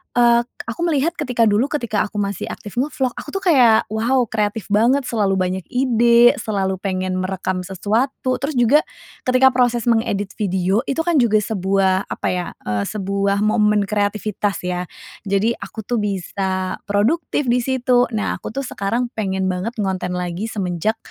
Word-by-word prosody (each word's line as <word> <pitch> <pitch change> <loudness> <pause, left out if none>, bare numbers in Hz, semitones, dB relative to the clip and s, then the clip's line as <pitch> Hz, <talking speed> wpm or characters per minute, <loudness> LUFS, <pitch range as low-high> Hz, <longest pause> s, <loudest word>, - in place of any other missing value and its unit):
eee, 235 -1 +5 0.2
aku 230 +4 -7
melihat 310 +1 +1
ketika 250 -5 +1
dulu 215 +6 +2
ketika 235 -9 -1
aku - - -24
masih 200 0 -2
aktif 210 +4 -6
nge-vlog, 265 -2 -1
aku - - -8
tuh 390 - -2
kayak, 250 - +5
wow 240 +4 +2
kreatif 215 -1 -2
banget, 245 +6 +3
selalu 205 -4 0
banyak 185 0 -1
ide, 240 -1 +4
selalu 190 -3 -2
pengen 185 -1 -2
merekam 185 0 -2
sesuatu, 230 +7 -1
terus 285 0 -2
juga 245 +5 +5 0.5
ketika 255 +1 +5
proses 245 -2 +1
mengedit 205 -4 0
video 190 0 +1
itu 325 +4 0
kan 335 -4 +2
juga 220 -3 +4
sebuah 190 -1 +1
apa - - -4
ya, 180 -1 -2 0.2
eee, 105 -1 -1
sebuah 200 0 -1
momen 210 -1 +3
kreativitas 205 -1 -1
ya, 180 -1 -3 0.4
jadi 200 +4 +2
aku 220 - -7
tuh 240 -2 -1
bisa 190 -1 -2
produktif 260 +10 +1
di 250 - +3
situ. 250 -1 +2
Nah 210 - -2
aku - - -6
tuh 275 - -2
sekarang 235 +3 -2
pengen 190 -3 -2
banget 185 +7 -4
ngonten 185 -3 -2
lagi 180 +4 -3
semenjak, 195 +1 -1
215 Hz, 160 wpm, -20 LUFS, 190-245 Hz, 0.5 s, eee